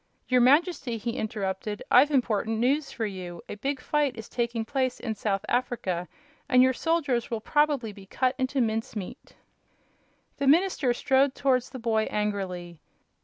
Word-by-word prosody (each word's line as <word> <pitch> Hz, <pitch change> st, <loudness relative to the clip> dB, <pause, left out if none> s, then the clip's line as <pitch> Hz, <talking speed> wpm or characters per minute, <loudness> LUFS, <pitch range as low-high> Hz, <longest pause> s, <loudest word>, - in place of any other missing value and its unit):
"Your 250 Hz, -1 st, +4 dB
Majesty," 275 Hz, -2 st, +3 dB
he 235 Hz, +2 st, -3 dB
interrupted, 210 Hz, -3 st, -3 dB
"I've 265 Hz, +4 st, +7 dB
important 225 Hz, -5 st, +1 dB
news 275 Hz, +6 st, +1 dB
for 225 Hz, -, -3 dB
you. 180 Hz, -4 st, -7 dB
A -, -, -6 dB
big 270 Hz, +6 st, -3 dB
fight 285 Hz, -1 st, 0 dB
is 225 Hz, -, -7 dB
taking 235 Hz, -2 st, -2 dB
place 260 Hz, 0 st, -1 dB
in 225 Hz, -, -3 dB
South 200 Hz, -2 st, -2 dB
Africa 230 Hz, -8 st, -1 dB, 0.4 s
and 250 Hz, 0 st, +6 dB
your 260 Hz, 0 st, +4 dB
soldiers 285 Hz, -6 st, 0 dB
will 230 Hz, -, -2 dB
probably 285 Hz, -3 st, +1 dB
be 195 Hz, -1 st, -14 dB
cut 255 Hz, +5 st, 0 dB
into 260 Hz, +1 st, 0 dB
mince 225 Hz, -1 st, -1 dB
meat." 195 Hz, -4 st, -8 dB, 1.0 s
The 280 Hz, -, -1 dB
minister 310 Hz, -3 st, +3 dB
strode 265 Hz, +2 st, +2 dB
towards 255 Hz, -2 st, +1 dB
the 260 Hz, -, -8 dB
boy 225 Hz, -2 st, +1 dB
angrily. 185 Hz, -5 st, -3 dB
240 Hz, 160 wpm, -27 LUFS, 210-270 Hz, 1.0 s, I've